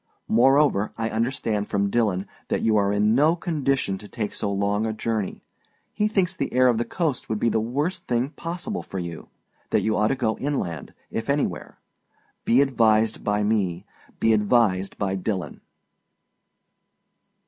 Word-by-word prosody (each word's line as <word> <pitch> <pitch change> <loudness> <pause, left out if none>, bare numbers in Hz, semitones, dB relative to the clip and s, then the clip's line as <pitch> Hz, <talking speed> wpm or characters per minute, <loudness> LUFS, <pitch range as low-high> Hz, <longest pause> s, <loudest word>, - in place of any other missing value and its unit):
Moreover, 135 -2 +3
I 115 0 -2
understand 115 -2 -1
from 100 0 0
Dillon 100 -5 +1 0.2
that - - -1
you 110 -1 +3
are 100 -1 +3
in 105 +1 +2
no 150 +7 +4
condition 140 - -1
to 105 - -10
take 105 -1 -4
so 100 - -2
long 100 +1 0
a 110 - -2
journey. 110 -2 -3 0.5
He 210 0 +1
thinks 190 -4 0
the 140 - -3
air 130 0 +5
of 115 -2 +1
the 120 - 0
coast 155 0 -2
would 110 - 0
be 115 - +2
the 110 - +1
worst 140 - -2
thing 125 +3 0
possible 175 +6 -5
for 95 - -8
you; 85 -3 -6 0.4
that - - +2
you 110 0 +1
ought 105 - +2
to 135 - +1
go 115 -4 -1
inland, 90 - -3 0.2
if 115 +3 -4
anywhere. 140 0 -1 0.7
Be 125 +4 +5
advised 115 -5 +2
by 105 0 +1
me. 100 -5 0 0.3
Be 115 - +4
advised 105 -3 +2
by 95 -2 -1
Dillon. 95 -1 -3
110 Hz, 165 wpm, -24 LUFS, 105-135 Hz, 0.7 s, air